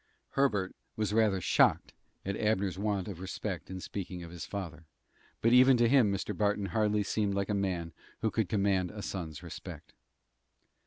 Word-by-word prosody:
Herbert 105 Hz, -9 st, +1 dB, 0.2 s
was 105 Hz, -2 st, -1 dB
rather 110 Hz, -4 st, +3 dB
shocked -, -, +3 dB, 0.3 s
at 100 Hz, +1 st, -1 dB
Abner's 100 Hz, -4 st, 0 dB
want 100 Hz, -3 st, -1 dB
of 95 Hz, -5 st, -6 dB
respect 95 Hz, -1 st, -5 dB
in 95 Hz, 0 st, -5 dB
speaking 90 Hz, -2 st, -6 dB
of 85 Hz, -, -9 dB
his 85 Hz, -1 st, -7 dB
father, 85 Hz, -5 st, -6 dB, 0.5 s
but 115 Hz, +1 st, +4 dB
even 130 Hz, +1 st, +7 dB
to 120 Hz, 0 st, +4 dB
him 120 Hz, -5 st, +5 dB
Mr. 100 Hz, -1 st, -2 dB
Barton 105 Hz, -1 st, +1 dB
hardly 105 Hz, -1 st, +2 dB
seemed 100 Hz, -1 st, 0 dB
like 100 Hz, 0 st, -1 dB
a -, -, +1 dB
man 90 Hz, -5 st, -1 dB, 0.3 s
who 110 Hz, -, +1 dB
could 110 Hz, -6 st, 0 dB
command 100 Hz, -3 st, +1 dB
a 105 Hz, +1 st, -7 dB
son's 80 Hz, -6 st, -5 dB
respect. -, -, -9 dB
100 Hz, 170 wpm, -31 LUFS, 95-105 Hz, 0.5 s, even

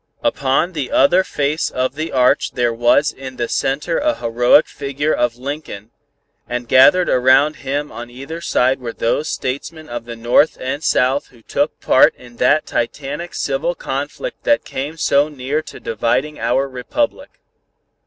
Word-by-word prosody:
Upon 140 Hz, +6 st, +1 dB
the 145 Hz, -5 st, -3 dB
other 175 Hz, +8 st, +4 dB
face 150 Hz, -1 st, -1 dB
of 130 Hz, +1 st, -1 dB
the 155 Hz, +3 st, -4 dB
arch 125 Hz, -1 st, +2 dB
there 120 Hz, -1 st, +1 dB
was 120 Hz, +6 st, +3 dB
in 130 Hz, -1 st, -9 dB
the 120 Hz, -, -1 dB
center 145 Hz, +8 st, -1 dB
a 305 Hz, 0 st, +1 dB
heroic 120 Hz, +5 st, +3 dB
figure 140 Hz, +2 st, -2 dB
of 120 Hz, -1 st, 0 dB
Lincoln 125 Hz, -5 st, -7 dB, 0.6 s
and 125 Hz, 0 st, -3 dB
gathered 175 Hz, +9 st, +6 dB
around 130 Hz, +4 st, +4 dB
him 145 Hz, +2 st, -3 dB
on 120 Hz, 0 st, -8 dB
either 135 Hz, +7 st, -8 dB
side 130 Hz, -4 st, +1 dB
were 120 Hz, -2 st, -6 dB
those 145 Hz, +6 st, -1 dB
Statesmen 155 Hz, +4 st, -4 dB
of 120 Hz, -1 st, -5 dB
the 120 Hz, 0 st, -7 dB
North 120 Hz, +7 st, +2 dB
and 140 Hz, +4 st, -4 dB
South 130 Hz, +3 st, +1 dB
who 120 Hz, -3 st, -21 dB
took -, -, -1 dB
part -, -, +5 dB
in 120 Hz, -1 st, -16 dB
that 150 Hz, +6 st, +3 dB
titanic 145 Hz, +7 st, -4 dB
civil -, -, -1 dB
conflict -, -, -5 dB
that 290 Hz, -, +2 dB
came 145 Hz, +5 st, -5 dB
so 145 Hz, -1 st, +2 dB
near 145 Hz, +1 st, -2 dB
to -, -, -11 dB
dividing 130 Hz, +7 st, -1 dB
our 125 Hz, +4 st, +1 dB
Republic. 135 Hz, -, -3 dB
135 Hz, 160 wpm, -18 LUFS, 125-155 Hz, 0.6 s, gathered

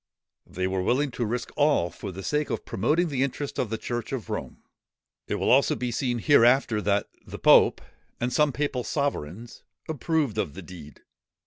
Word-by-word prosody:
They 95 Hz, +1 st, -3 dB
were 95 Hz, 0 st, -1 dB
willing 130 Hz, +8 st, +1 dB
to 120 Hz, 0 st, -2 dB
risk 120 Hz, +2 st, -3 dB
all 145 Hz, -, +2 dB
for 100 Hz, -, -7 dB
the 95 Hz, +2 st, -8 dB
sake 150 Hz, +5 st, -1 dB
of -, -, -3 dB
promoting 155 Hz, -, +1 dB
the 135 Hz, -3 st, -1 dB
interests 140 Hz, +1 st, -2 dB
of 120 Hz, -, -1 dB
the 110 Hz, -, -2 dB
church 120 Hz, 0 st, -4 dB
of 130 Hz, -5 st, -4 dB
Rome. -, -, -6 dB, 0.6 s
It -, -, -1 dB
will -, -, +1 dB
also -, -, +4 dB
be 125 Hz, -1 st, -3 dB
seen 120 Hz, 0 st, -1 dB
hereafter 120 Hz, -3 st, +4 dB
that 100 Hz, 0 st, +1 dB, 0.2 s
the -, -, -9 dB
pope, -, -, +5 dB, 0.4 s
and 120 Hz, +1 st, -1 dB
some 150 Hz, -1 st, +3 dB
papal 135 Hz, -3 st, -2 dB
sovereigns, 115 Hz, -, -3 dB, 0.3 s
approved 150 Hz, -6 st, -1 dB
of 85 Hz, -8 st, -2 dB
the 95 Hz, -, -8 dB
deed. 80 Hz, -5 st, -12 dB
120 Hz, 185 wpm, -26 LUFS, 100-140 Hz, 0.6 s, pope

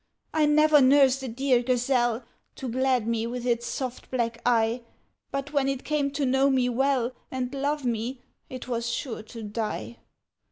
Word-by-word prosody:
I 310 Hz, -1 st, +3 dB
never 305 Hz, 0 st, +5 dB
nursed 270 Hz, 0 st, +5 dB
a 265 Hz, -, -4 dB
dear 250 Hz, +1 st, +2 dB
gazelle, 245 Hz, -1 st, +1 dB, 0.3 s
To 265 Hz, -, -6 dB
glad 255 Hz, -1 st, +1 dB
me 230 Hz, 0 st, -1 dB
with 245 Hz, 0 st, -5 dB
its 235 Hz, -1 st, 0 dB
soft 255 Hz, -2 st, -5 dB
black 235 Hz, -2 st, -2 dB
eye, 230 Hz, 0 st, +2 dB, 0.5 s
But 275 Hz, +1 st, -4 dB
when 280 Hz, -2 st, +2 dB
it 270 Hz, -1 st, -2 dB
came 295 Hz, -2 st, 0 dB
to 285 Hz, -1 st, 0 dB
know 265 Hz, +2 st, +3 dB
me 255 Hz, -2 st, +2 dB
well, 255 Hz, 0 st, +1 dB, 0.2 s
And 255 Hz, 0 st, -3 dB
love 285 Hz, +1 st, -1 dB
me, 240 Hz, +2 st, -2 dB, 0.3 s
it 255 Hz, -1 st, -7 dB
was 235 Hz, -1 st, -2 dB
sure 230 Hz, -1 st, -3 dB
to 225 Hz, +1 st, -10 dB
die! 210 Hz, -, -4 dB
255 Hz, 170 wpm, -26 LUFS, 235-275 Hz, 0.5 s, never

